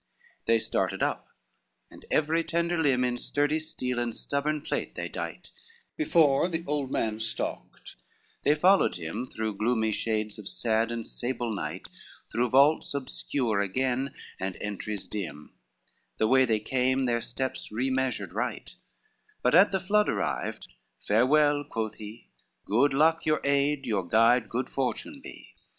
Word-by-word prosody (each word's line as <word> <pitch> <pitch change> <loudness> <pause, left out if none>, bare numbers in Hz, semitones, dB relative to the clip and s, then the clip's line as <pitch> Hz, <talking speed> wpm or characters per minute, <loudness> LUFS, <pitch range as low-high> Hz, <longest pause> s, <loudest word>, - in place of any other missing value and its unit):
II - - -37 0.3
They - - +3
started - - -1
up, - - -1 0.6
and - - -14
every 160 +2 +2
tender 170 0 0
limb 135 -5 +2
In 125 -1 -1
sturdy 145 +2 0
steel 125 -6 -3
and 120 -2 -2
stubborn 150 +1 -1
plate - - -3
they - - -3
dight, - - -6 0.4
Before 165 - +4
the 165 -2 -3
old 145 -2 -1
man 110 -4 -1
stalked, 110 0 0 0.4
they 145 - +3
followed 185 +6 +4
him 85 +9 -5
Through 110 -4 -4
gloomy 110 0 +1
shades 110 -1 -2
of 100 - -6
sad 115 0 +1
and 115 -1 -4
sable 120 -2 -3
night, 100 - -5 0.4
Through 120 +2 +1
vaults 140 +3 +4
obscure 130 -4 -2
again 130 +6 -1 0.2
and 95 -1 -3
entries 105 -1 -4
dim, 90 -7 -6 0.6
The - - +2
way 130 +2 +5
they 110 -3 +1
came 130 +2 +1
their 120 -1 +1
steps 130 +2 -4
remeasured 130 +2 -1
right; - - -3 0.7
But 125 - +3
at 195 +3 +7
the 190 - +1
flood 210 +3 +2
arrived, - - -2 0.4
"Farewell," 145 +6 +4
quoth 110 -6 -3
he, 110 +2 -10 0.4
"Good 125 +8 +3
luck 160 +4 +3
your 155 0 +3
aid, 140 0 +1
your 100 -7 -1
guide 115 +4 +4
good 125 +2 -2
fortune 205 - -3
be." - - -11
130 Hz, 150 wpm, -28 LUFS, 110-145 Hz, 0.7 s, at